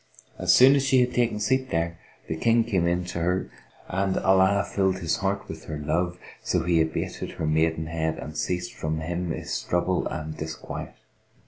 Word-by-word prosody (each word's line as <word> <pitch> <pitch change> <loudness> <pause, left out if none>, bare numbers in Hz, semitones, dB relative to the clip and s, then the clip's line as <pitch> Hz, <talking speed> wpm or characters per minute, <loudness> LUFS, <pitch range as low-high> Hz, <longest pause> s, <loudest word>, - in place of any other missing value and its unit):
As - - +3
soon 135 +2 +8
as 140 - +2
she 130 -1 +4
had 125 0 +1
taken 115 -3 +1
seat 130 +4 +1
there, 85 0 -1 0.3
the 80 - -2
King 115 +6 +3
came 95 -7 +1
in 90 +1 0
to 85 -1 -4
her 90 +2 0 0.4
and 95 +1 0
Allah 95 +1 +3
filled 95 -2 +1
his 85 -4 -1
heart 100 +1 -2
with 80 0 -8
her 75 - -5
love 85 +4 -1 0.2
so - - 0
he 85 -2 +3
abated 80 0 -3
her 80 - -3
maidenhead 80 +1 0
and 75 +3 -7
ceased 90 +2 -2
from 80 0 -3
him 85 +2 -3
his 80 - -3
trouble 90 +1 0
and 75 0 -5
disquiet. 80 -1 -6
90 Hz, 185 wpm, -26 LUFS, 80-100 Hz, 0.4 s, soon